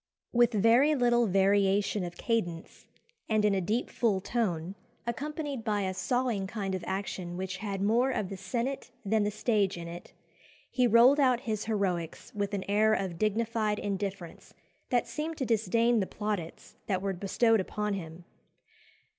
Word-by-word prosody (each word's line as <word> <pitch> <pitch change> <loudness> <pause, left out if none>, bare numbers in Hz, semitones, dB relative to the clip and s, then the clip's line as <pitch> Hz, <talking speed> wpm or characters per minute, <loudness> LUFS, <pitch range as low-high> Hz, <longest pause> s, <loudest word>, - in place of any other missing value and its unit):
"With 240 -1 +4
very 235 +8 +4
little 240 -2 +3
variation 195 +1 +2
of 175 0 -6
cadence, 175 -8 -3 0.4
and 215 -1 +2
in 210 - +3
a 195 - +1
deep 215 +7 -1
full 215 -5 +1
tone, 185 -5 -2 0.3
accompanied 285 +1 -4
by 210 -2 0
a 190 -1 -1
sawing 240 -1 -1
kind 195 -2 -3
of 185 -2 -3
action 190 -2 -4
which 190 0 -4
had 200 -1 -3
more 235 +6 +3
of 210 -7 -2
the 195 - -5
senate 235 +9 -3 0.2
than 210 +1 +2
the - - +1
stage 210 -3 0
in 170 0 -6
it, 170 +1 -9 0.6
he 250 -1 +3
rolled 240 +5 +6
out 255 -3 +3
his 215 -4 -3
heroics 190 -7 -2
with 205 -1 -2
an 190 - -3
air 215 +2 +3
of 185 -4 -3
dignified 215 0 0
indifference 195 -4 -5 0.3
that 245 -2 +2
seemed 310 +1 -4
to 265 - -1
disdain 230 +1 +2
the 190 - -1
plaudits 205 -6 -5
that 190 -2 -1
were 195 -1 0
bestowed 220 +5 +2
upon 210 +2 -2
him. 170 -2 -7
210 Hz, 165 wpm, -29 LUFS, 190-235 Hz, 0.6 s, rolled